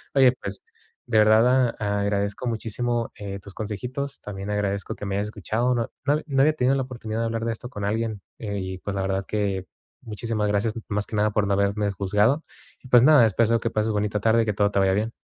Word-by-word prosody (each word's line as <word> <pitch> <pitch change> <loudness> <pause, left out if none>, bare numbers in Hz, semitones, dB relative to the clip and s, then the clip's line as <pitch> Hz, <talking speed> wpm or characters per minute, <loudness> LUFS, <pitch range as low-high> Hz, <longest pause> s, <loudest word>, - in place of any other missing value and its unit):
oye, 130 -2 +7
pues, 100 0 -6 0.4
de 115 -3 +1
verdad 115 +3 +4
a 100 -1 0
agradezco 100 +3 -1
muchísimo, 115 +1 -2
eh, 100 -1 -6
tus 100 +1 -12
consejitos, 125 +6 -4
también 100 0 -6
agradezco 100 -1 -2
que 105 - -7
me 100 0 -2
hayas 100 +1 -1
escuchado, 115 +4 -1
no 115 -1 -1 0.2
no 145 +1 +3
no 135 -3 +1
había 155 +2 +5
tenido 135 -2 +2
la 135 - 0
oportunidad 115 -3 -5
de 115 - 0
hablar 115 0 -2
de 115 - 0
esto 120 +2 -7
con 105 -5 -6
alguien, 110 -1 -2 0.2
eh, 100 -3 -4
y, 95 0 -4
pues, 100 +1 -4
la 95 - -1
verdad 95 0 -1
que, 100 -3 -1 0.4
muchísimas 110 -1 -2
gracias, 105 +2 +1 0.2
más 105 -1 -1
que 110 - -5
nada, 105 0 +2
por 105 -1 +1
no 100 - +1
haberme 100 +1 +1
juzgado, 105 - +1 0.5
pues, 125 -2 +7
nada, 145 -4 +7
espero 115 +2 +2
que 115 - -1
pases 110 0 0
bonita 105 0 0
tarde 115 +1 +4
y - - -3
que 105 - 0
todo 100 +1 +1
te 100 - +1
vaya 95 -1 +3
bien. 110 +3 -1
105 Hz, 225 wpm, -24 LUFS, 100-115 Hz, 0.5 s, oye